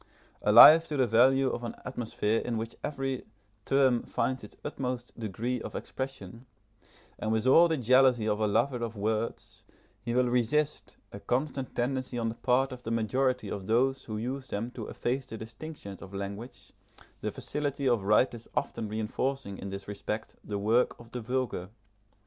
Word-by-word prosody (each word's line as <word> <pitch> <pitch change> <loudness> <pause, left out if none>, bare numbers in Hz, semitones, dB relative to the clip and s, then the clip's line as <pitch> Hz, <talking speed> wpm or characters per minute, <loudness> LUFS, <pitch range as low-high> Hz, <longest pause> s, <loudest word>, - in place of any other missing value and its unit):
Alive 165 +2 +9
to 150 - -3
the 130 - +4
value 130 +4 +4
of 120 - -4
an 115 - -5
atmosphere 115 -3 -1
in 120 -2 -2
which 115 +1 -4
every 135 -3 -2 0.4
term 130 -3 +3
finds 125 +1 -2
its 105 - -11
utmost 125 -4 -4
degree 115 +3 -3
of - - -7
expression, 130 -3 -6 0.7
and 110 - -1
with 110 +1 +1
all 165 +7 +7
the 160 -1 0
jealousy 130 -2 +4
of 105 0 0
a 110 - +2
lover 120 +4 +1
of 115 -1 -4
words, 110 +2 -3 0.4
he 120 0 -3
will 125 0 +3
resist 125 +5 0
a - - -8
constant 135 +1 -2
tendency 130 0 -1
on 115 -1 0
the - - -4
part 130 +3 +1
of 125 -1 -8
the 115 - -6
majority 125 +3 0
of 95 -2 -5
those 130 +4 +2
who 110 -2 -4
use 130 +4 -4
them 115 +4 -3
to 115 -4 -7
efface 130 +2 -2
the 110 - -7
distinctions 110 - -9
of 100 0 -10
language, 100 +5 -7 0.5
the - - -3
facility 145 -2 -2
of 120 -4 +3
writers 110 +3 +2
often 110 - -2
reinforcing 110 +1 -2
in 100 - -6
this 100 0 -7
respect 105 +2 -5
the 105 - -4
work 110 +5 +2
of 120 0 -14
the 125 - -5
vulgar. 120 -6 -2
120 Hz, 170 wpm, -29 LUFS, 110-130 Hz, 0.7 s, Alive